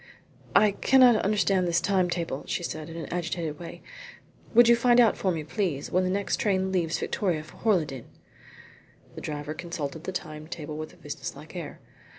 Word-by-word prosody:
"I 210 -1 +6
cannot 250 +2 +5
understand 190 -2 +2
this 170 0 +2
time 190 -3 +1
table," 165 -6 -3
she 175 - -2
said, 155 -2 -5
in 165 - -8
an 165 - -5
agitated 165 -3 -3
way. 170 - -9 0.7
"Would 240 0 +8
you 235 - +7
find 240 +1 +4
out 230 -3 +5
for 190 - 0
me, 160 -3 -3
please, 160 -4 -2
when 185 +1 +2
the 185 - 0
next 200 +1 0
train 190 -3 +1
leaves 170 -3 0
Victoria 175 -6 -1
for 155 - -15
Horleydene?" 155 - 0 1.0
The - - -8
driver 150 0 -4
consulted 160 -1 -5
the - - -2
time 155 -4 -6
table 155 -3 -6
with 155 0 -6
a - - -19
businesslike - - -8
air. - - -7
175 Hz, 180 wpm, -27 LUFS, 155-200 Hz, 1.0 s, Would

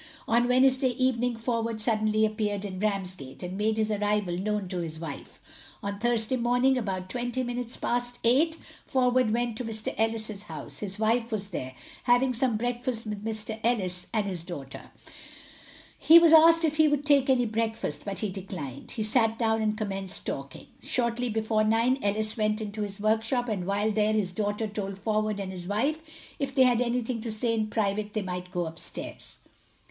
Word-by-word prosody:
On 235 +1 +3
Wednesday 260 +1 +4
evening 245 -1 0
Forward 230 -1 -2
suddenly 215 -1 +2
appeared 210 -2 -2
in 185 -2 -5
Ramsgate, 185 -9 -3
and 180 +1 -5
made 215 +2 0
his 215 0 +1
arrival 205 -3 0
known 205 +1 -1
to 180 -1 -3
his 160 -2 -4
wife. 160 -4 -8 0.4
On 200 0 -3
Thursday 240 +1 +1
morning, 245 +2 +3
about 190 -6 -2
twenty 245 +4 -2
minutes 245 0 -4
past 245 0 -2
eight, 305 +8 +3 0.3
Forward 255 -2 +2
went 235 0 0
to 250 - -3
Mr 220 -2 -3
Ellis's 220 -2 -1
house. - - -7
His 195 -1 -4
wife 230 +2 +1
was 205 -2 -3
there, 130 -8 -5 0.3
having 250 +1 +4
some 240 -2 +1
breakfast 245 0 -2
with 210 -1 -5
Mr 220 0 -4
Ellis 185 -7 0
and 215 -2 0
his 180 -4 -4
daughter. 145 -6 -8 1.1
He 330 - +8
was 335 -1 +7
asked 330 +1 +7
if 310 -1 0
he 315 -1 +6
would 295 -1 0
take 280 -2 +4
any 250 -2 +4
breakfast, 220 -9 -2
but 200 -1 -4
he 215 - -1
declined. 185 -9 -7
He 220 - -2
sat 225 0 +2
down 225 -1 +1
and 215 0 0
commenced 195 -3 -3
talking. 135 0 -5 0.2
Shortly 240 0 0
before 220 0 +1
nine 230 +4 +2
Ellis 215 +2 0
went 215 0 +1
into 215 0 -5
his 200 0 -4
workshop, 225 +4 +1
and 195 -5 -2
while 205 +2 +1
there 215 0 +2
his 205 -4 0
daughter 205 +3 -1
told 200 -2 -5
Forward 215 0 -1
and 190 -1 -4
his 180 -2 -7
wife 270 +11 0 0.4
if 275 -2 -3
they 265 - +6
had 245 -2 +4
anything 245 -1 -1
to 230 0 -4
say 230 +2 0
in 220 -1 0
private 210 -1 -1
they 215 - -1
might 180 -1 -5
go 175 -1 -2
up 160 0 -7
stairs. - - -7
220 Hz, 185 wpm, -28 LUFS, 200-245 Hz, 1.1 s, He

